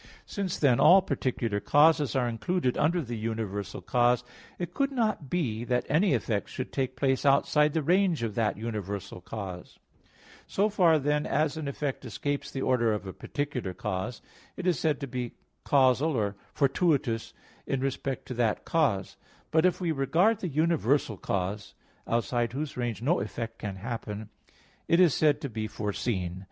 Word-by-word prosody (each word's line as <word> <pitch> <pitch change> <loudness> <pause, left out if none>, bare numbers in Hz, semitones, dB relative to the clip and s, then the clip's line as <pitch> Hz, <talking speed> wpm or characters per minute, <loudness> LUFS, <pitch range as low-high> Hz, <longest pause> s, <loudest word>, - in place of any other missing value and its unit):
Since 195 -4 -3
then, 130 -5 +3
all 190 +1 +7
particular 120 - -1
causes 150 +2 +4
are 125 -2 +2
included 125 - -1
under 170 +3 +2
the 120 -2 -5
universal 110 -3 -4
cause, 125 -1 +2 0.3
it 175 - -5
could 275 0 0
not 215 - -1
be 120 -11 -1
that 125 0 0
any 165 +2 +3
effect 110 -3 -2
should 130 - -6
take 130 -2 -1
place 135 0 +1
outside 150 +1 +3
the 160 - 0
range 175 -3 +2
of 110 -2 -2
that 110 0 0
universal 100 -4 -5
cause. 95 -3 -7 0.7
So 205 +2 +1
far 180 -6 +4
then 150 +1 0
as 150 +1 +1
an 155 -2 -4
effect 140 0 -3
escapes 145 +4 -3
the 135 - -4
order 120 -3 +2
of 105 -1 -4
a 95 - -6
particular 130 -10 -4
cause, 105 +5 -4 0.3
it 185 - -5
is 180 -3 +2
said 155 -3 +1
to 140 - -3
be 125 -2 -4 0.4
casual 135 +2 +4
or 100 -3 0 0.2
fortuitous 140 -5 +1 0.4
in 135 - 0
respect 135 0 -2
to - - -2
that 115 -3 0
cause; 125 - 0 0.3
but 160 +3 +5
if 180 - -1
we 175 -3 0
regard 165 - +2
the 190 - -3
universal 145 -6 +1
cause, 100 +2 -3 0.3
outside 120 +1 0
whose 145 +2 -4
range 120 -2 -3
no 170 +8 +2
effect 115 -1 -5
can 105 -3 -4
happen, 105 0 -5 0.6
it 170 - +4
is 175 -6 +6
said 150 -2 +3
to 145 - -2
be 110 -3 -4
foreseen. 100 -4 -3
130 Hz, 165 wpm, -28 LUFS, 110-155 Hz, 0.7 s, all